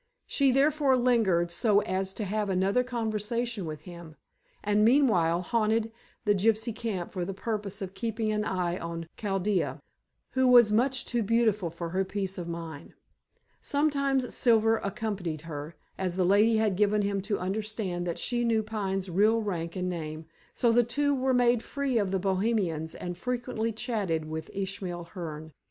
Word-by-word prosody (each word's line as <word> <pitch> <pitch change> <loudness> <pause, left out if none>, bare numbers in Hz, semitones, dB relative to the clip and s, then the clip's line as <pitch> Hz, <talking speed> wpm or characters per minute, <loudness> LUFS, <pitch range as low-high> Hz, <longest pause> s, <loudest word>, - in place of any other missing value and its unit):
She 275 -2 +2
therefore 275 0 +3
lingered 215 -9 +2
so 205 +3 +3
as 190 0 -2
to 215 - -4
have 210 +1 -1
another 195 +6 +2
conversation 230 -3 -2
with 155 -1 -6
him, 170 -2 -11 0.5
and 210 0 +3
meanwhile 210 - +4
haunted 225 +1 +1 0.3
the 205 - +4
gypsy 220 +3 +1
camp 200 -8 -3
for 185 -3 -3
the 190 +2 -4
purpose 205 -2 -3
of 190 0 -6
keeping 225 -1 -2
an 210 0 0
eye 180 -3 -1
on 170 0 -5
Chaldea, 195 -2 -1 0.5
who 260 0 +2
was 240 -4 +7
much 255 +4 +2
too 240 -1 0
beautiful 215 -4 +2
for 170 +1 -6
her 190 +3 0
peace 195 -1 -3
of 170 - -5
mind. 165 -3 -7 0.7
Sometimes 280 -3 +1
Silver 225 -2 +4
accompanied 200 -7 -3
her, 155 0 -7 0.2
as 185 -2 -1
the 185 -1 +2
lady 210 +4 +4
had 215 -3 +2
given 210 +1 +2
him 200 -1 0
to 205 +1 -1
understand 190 -2 -3
that 170 - -2
she 240 -1 -1
knew 225 -2 +2
Pine's 195 -3 -2
real 215 +5 +3
rank 170 -5 -3
and 185 -1 -2
name, 160 -3 -5 0.3
so 235 - +2
the 240 +1 +5
two 285 +5 +1
were 265 -1 +1
made 245 -2 +3
free 275 -3 -1
of 200 -3 0
the 190 - 0
Bohemians 190 -4 0
and 175 0 -5
frequently 240 -2 -2
chatted 210 -9 -2
with 160 0 -5
Ishmael 190 -3 -4
Hearne. 160 -3 -6
205 Hz, 165 wpm, -28 LUFS, 180-230 Hz, 0.7 s, was